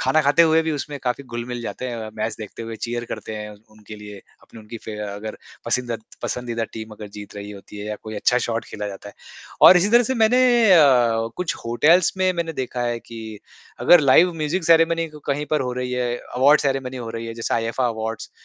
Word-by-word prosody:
खाना 155 - +3
खाते 145 +4 +5
हुए 160 0 +4
भी 160 - -2
उसमें 145 0 -5
काफ़ी 125 +2 -2
घुल-मिल 120 0 -5
जाते 130 - -5
हैं। 115 -3 -5
मैच 110 0 -3
देखते 110 +1 -8
हुए 115 0 -6
चीयर 120 +1 -4
करते 110 -1 -7
हैं 105 0 -6 0.2
उनके 110 0 -12
लिए 105 -1 -10 0.2
अपनी 115 - -14
उनकी 110 +2 -9
फे 110 -1 -6
अगर 105 +2 -7 0.3
पसिंदद 120 -3 -2 0.2
पसंदीदा 120 -2 -3
टीम 110 0 -7
अगर 105 0 -9
जीत 105 -1 -10
रही 100 0 -7
होती 105 0 -12
है 105 - -6
या 105 0 -4
कोई 110 0 -7
अच्छा 125 +4 +2
शॉट 115 -1 -2
खेला 105 -1 -6
जाता 100 +1 -9
है। - - -13 0.5
और 185 - +10
इसी 180 +3 +3
तरह 240 +1 +6
से 260 +2 -1
मैंने 235 +2 +3 0.3
अ, 120 -8 +4
कुछ 180 -3 -2
होटल्स 155 +10 +4
में 185 0 +2
मैंने 170 -2 -3
देखा 125 -3 -4
है 120 -1 -1
कि 115 -1 -10 0.6
अगर 175 - +7
लाइव 155 +6 +5
म्यूज़िक 160 +3 -2
सेरेमनी 165 0 +3 0.2
कहीं 145 +1 -1
पर 155 -2 +2
हो 125 -1 -2
रही 125 0 -4
है, 125 -1 -1
अवॉर्ड 140 +4 +3
सेरेमनी 135 -2 -2
हो 115 -2 -6
रही 115 0 -6
है। 115 - -6
जैसे 115 - -2
आईफा 115 +2 0
अवॉर्ड्स 110 -1 -5
120 Hz, 215 wpm, -22 LUFS, 110-150 Hz, 0.6 s, और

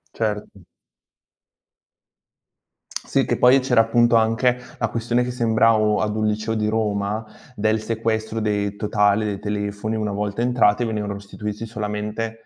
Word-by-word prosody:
Certo. 105 -3 -3 2.4
Sì, - - +1
che - - 0
poi 130 +2 +6
c'era 125 -3 +3
appunto 120 +1 +3
anche 115 +3 +2 0.2
la 115 - +1
questione 120 +2 0
che 125 - -3
sembravo 110 -2 +2
ad 105 0 -1
un 110 - 0
liceo 110 +1 -1
di 105 -1 0
Roma 105 0 -1 0.3
del 110 -1 0
sequestro 110 0 -2
dei 105 -1 -1
totale 105 0 +2
dei 100 -2 -3
telefoni 105 +1 -3
una 105 -1 -2
volta 105 +2 -2
entrati 120 -2 +3
venivano 105 -2 -3
restituiti 105 +2 -6
solamente 110 +1 -4
110 Hz, 135 wpm, -22 LUFS, 105-115 Hz, 2.4 s, poi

